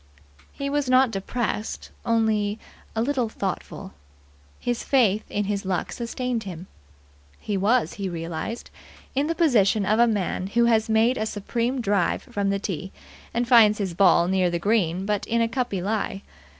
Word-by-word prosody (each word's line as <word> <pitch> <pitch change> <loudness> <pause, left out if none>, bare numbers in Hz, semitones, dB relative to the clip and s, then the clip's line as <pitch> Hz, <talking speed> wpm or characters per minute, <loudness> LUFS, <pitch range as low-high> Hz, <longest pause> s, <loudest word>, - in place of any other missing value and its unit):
He 280 - -5
was 285 -2 -1
not 255 -1 +5
depressed 215 +2 -3 0.2
only 220 -2 +1 0.4
a 220 - +1
little 255 -3 0
thoughtful. 195 -4 -5 0.7
His 240 -1 -2
faith 220 -6 +2
in 205 - -1
his 200 0 -2
luck 185 -2 -2
sustained 240 0 -3
him. 180 -4 -7 0.7
He 205 - -3
was, 220 +6 +2
he 195 -2 -4
realized, 170 +7 -5 0.4
in 280 +3 +1
the 330 - -1
position 220 - +3
of 215 +3 +2
a 240 - +6
man 195 -4 -1
who 235 +4 +2
has 225 -1 +2
made 225 +3 +3
a 215 - -1
supreme 235 +5 -2
drive 200 -5 +1
from 205 -5 -2
the 200 - +1
tee, 190 -2 -5 0.4
and 240 +1 -1
finds 225 -4 +6
his 195 -4 -2
ball 175 -1 +4
near 185 -1 +2
the 175 - -1
green 185 -2 +1
but 210 -1 -1
in 235 0 +1
a 230 - +3
cuppy 230 -6 -2
lie. 200 -1 -2
215 Hz, 165 wpm, -24 LUFS, 195-235 Hz, 0.7 s, a